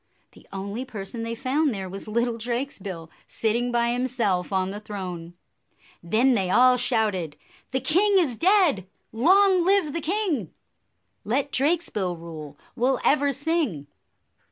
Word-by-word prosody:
The - - -19
only 200 +5 -5
person 225 -2 -7
they 230 0 -3
found 275 +4 0
there 190 -1 -5
was 195 +3 -8
little 235 +1 -1
Drakesbill, 220 - -4 0.2
sitting 235 +2 -1
by 235 0 +1
him 250 +1 0
self 205 -8 -1
on 190 -1 0
the 205 - -6
throne. 180 -5 -7 0.7
Then 225 +10 +2
they 195 -5 0
all 250 +5 +5
shouted, 215 - -1 0.3
"The 260 0 -1
king 385 +9 +3
is 305 -10 +2
dead! 340 - +3 0.2
Long 370 - +4
live 375 -5 +2
the 335 - -2
king! 330 - -1 0.7
Let 270 +6 -1
Drakesbill 265 - 0
rule, 155 -3 -9 0.2
we 245 - +1
'll 265 -2 +1
ever 285 0 +3
sing." 285 - -1
235 Hz, 145 wpm, -25 LUFS, 195-285 Hz, 0.7 s, all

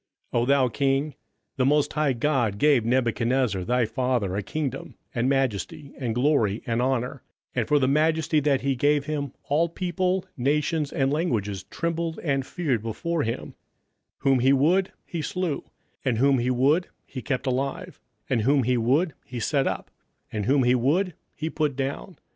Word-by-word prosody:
27:005:018 120 - +3
O - - +1
thou 140 -2 +4
king, 135 +3 0 0.4
the 130 - +2
most 150 0 +2
high 150 -2 +2
God 120 -5 0
gave 145 -2 +4
Nebuchadnezzar 120 -3 +1
thy 125 +4 +1
father 120 -5 -1
a 100 - 0
kingdom, 140 +6 -4 0.2
and 120 +2 +1
majesty, 135 +3 -1
and 120 -4 -3
glory, 120 -6 +2
and 115 0 0
honour: 130 0 -1 0.3
27:005:019 - - -14
And 120 - +1
for 150 - +4
the 130 -2 +2
majesty 155 +2 +2
that 140 -2 +1
he 135 +1 0
gave 145 +2 +2
him, 145 -3 -3
all 165 +4 +1
people, 185 +2 -1
nations, 150 +3 0
and 135 0 +1
languages, 105 - -1
trembled 165 -1 -3
and 135 -4 0
feared 145 - -1
before 160 +9 -2
him: 115 -2 -3 0.6
whom 135 -2 +2
he 130 +3 +4
would 175 +8 +3
he 170 - -4
slew; 175 -2 -2 0.4
and 125 -4 +1
whom 135 +1 +4
he 120 +2 0
would 140 +8 +2 0.2
he 130 - -7
kept 130 +3 -2
alive; 135 +1 -2 0.3
and 125 -4 +1
whom 135 +4 +3
he 125 +1 +2
would 140 +8 +2
he 125 -1 -7
set 135 +3 +1
up; - - -4 0.4
and 105 -1 -2
whom 135 0 +4
he 125 0 +4
would 155 +10 +1 0.2
he 155 - -3
put 155 -3 -1
down. 140 +7 -4
135 Hz, 175 wpm, -25 LUFS, 125-150 Hz, 0.6 s, thou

